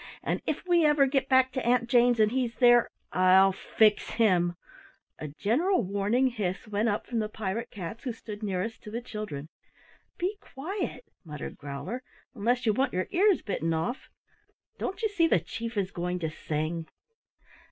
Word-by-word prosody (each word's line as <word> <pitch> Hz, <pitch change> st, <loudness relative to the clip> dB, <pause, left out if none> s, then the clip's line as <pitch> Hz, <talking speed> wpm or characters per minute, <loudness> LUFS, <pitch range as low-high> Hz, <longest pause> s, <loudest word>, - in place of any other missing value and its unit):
"And -, -, -1 dB
if -, -, -2 dB
we 350 Hz, -2 st, +4 dB
ever 295 Hz, -2 st, +5 dB
get 270 Hz, 0 st, 0 dB
back 260 Hz, -1 st, +4 dB
to 260 Hz, 0 st, -3 dB
Aunt 240 Hz, 0 st, +2 dB
Jane's 240 Hz, -1 st, +4 dB
and 215 Hz, 0 st, +4 dB
he's 245 Hz, -2 st, -1 dB
there, 240 Hz, -2 st, +5 dB, 0.2 s
I'll 185 Hz, +1 st, +6 dB
fix 210 Hz, +2 st, +2 dB
him 180 Hz, -6 st, +3 dB, 0.3 s
" -, -, -34 dB
A 155 Hz, -, -5 dB
general 240 Hz, -, +1 dB
warning 205 Hz, +6 st, +1 dB
hiss 210 Hz, 0 st, -3 dB
went 210 Hz, +2 st, 0 dB
up 205 Hz, -, -1 dB
from 235 Hz, -, -2 dB
the 215 Hz, -1 st, -1 dB
pirate 220 Hz, +2 st, -4 dB
cats 200 Hz, +3 st, -7 dB
who 255 Hz, -, -2 dB
stood 215 Hz, -2 st, -9 dB
nearest 205 Hz, +2 st, -3 dB
to -, -, -9 dB
the 225 Hz, +2 st, -3 dB
children. 210 Hz, -, -6 dB, 0.7 s
"Be 380 Hz, +4 st, -2 dB
quiet," 385 Hz, -, -5 dB, 0.2 s
muttered 150 Hz, -5 st, -7 dB
Growler, 145 Hz, -, -6 dB, 0.3 s
"unless 240 Hz, +2 st, 0 dB
you 215 Hz, -, +3 dB
want 265 Hz, +4 st, 0 dB
your 185 Hz, +1 st, 0 dB
ears 390 Hz, 0 st, +3 dB
bitten 165 Hz, -5 st, -1 dB
off? 165 Hz, -, -3 dB, 0.7 s
Don't 390 Hz, +4 st, -4 dB
you -, -, +4 dB
see 375 Hz, -6 st, +2 dB
the 250 Hz, -, +3 dB
Chief 225 Hz, +6 st, -6 dB
is 195 Hz, -1 st, 0 dB
going 180 Hz, 0 st, -2 dB
to 160 Hz, -3 st, -3 dB
sing?" 155 Hz, +1 st, -3 dB
220 Hz, 175 wpm, -28 LUFS, 185-255 Hz, 0.7 s, I'll